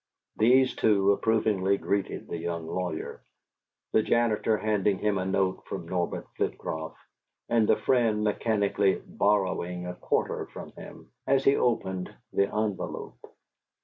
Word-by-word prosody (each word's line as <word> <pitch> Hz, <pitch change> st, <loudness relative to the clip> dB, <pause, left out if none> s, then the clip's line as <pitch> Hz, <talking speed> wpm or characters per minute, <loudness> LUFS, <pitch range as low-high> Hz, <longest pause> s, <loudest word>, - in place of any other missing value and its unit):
These 130 Hz, +4 st, +4 dB
two 100 Hz, -2 st, +3 dB
approvingly 100 Hz, -2 st, +2 dB
greeted 100 Hz, -1 st, -2 dB
the 85 Hz, -, -4 dB
young 85 Hz, -1 st, -3 dB
lawyer, 85 Hz, -1 st, -4 dB, 0.7 s
the 110 Hz, -, +4 dB
janitor 110 Hz, -1 st, +2 dB
handing 105 Hz, -2 st, +1 dB
him 105 Hz, -1 st, 0 dB
a 95 Hz, -, -2 dB
note 95 Hz, 0 st, 0 dB
from 85 Hz, -3 st, -5 dB
Norbert 90 Hz, -1 st, -2 dB
Flitcroft, 80 Hz, 0 st, -3 dB, 0.5 s
and 115 Hz, -2 st, +3 dB
the -, -, +5 dB
friend 115 Hz, -5 st, +2 dB
mechanically 100 Hz, -2 st, +1 dB
"borrowing" 90 Hz, -3 st, 0 dB
a 90 Hz, -, -4 dB
quarter 90 Hz, -, -1 dB
from -, -, -9 dB
him -, -, -12 dB, 0.2 s
as 135 Hz, 0 st, +3 dB
he 135 Hz, -, +5 dB
opened 95 Hz, -6 st, 0 dB, 0.2 s
the 100 Hz, -, +3 dB
envelope. 105 Hz, -2 st, -3 dB
100 Hz, 130 wpm, -28 LUFS, 95-110 Hz, 0.7 s, the